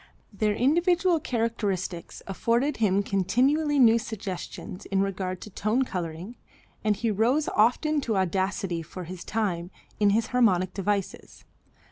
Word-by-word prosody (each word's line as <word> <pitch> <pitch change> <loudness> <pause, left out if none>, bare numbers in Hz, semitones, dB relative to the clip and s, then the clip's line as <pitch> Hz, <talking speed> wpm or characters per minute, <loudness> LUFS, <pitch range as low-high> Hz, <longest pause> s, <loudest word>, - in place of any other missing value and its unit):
Their 210 +1 0
individual 340 - +3
characteristics 210 - -3
afforded 235 +8 0
him 200 -2 +2
continually 270 - +1
new 235 -3 +6
suggestions 195 -4 -6
in 195 -1 +1
regard 185 -2 -3
to 210 - -9
tone 215 +7 +1
coloring, 180 +3 -5 0.5
and 215 -2 +2
he 225 +2 -1
rose 245 +9 +2
often 285 +8 +2
to 225 -6 -1
audacity, 190 -1 -1
for 180 +3 -8
his 175 +1 -8
time, 180 -6 -2 0.3
in 205 -1 +4
his 220 +3 +2
harmonic 185 -7 +3
devices. 200 0 -3
210 Hz, 130 wpm, -26 LUFS, 190-240 Hz, 0.5 s, new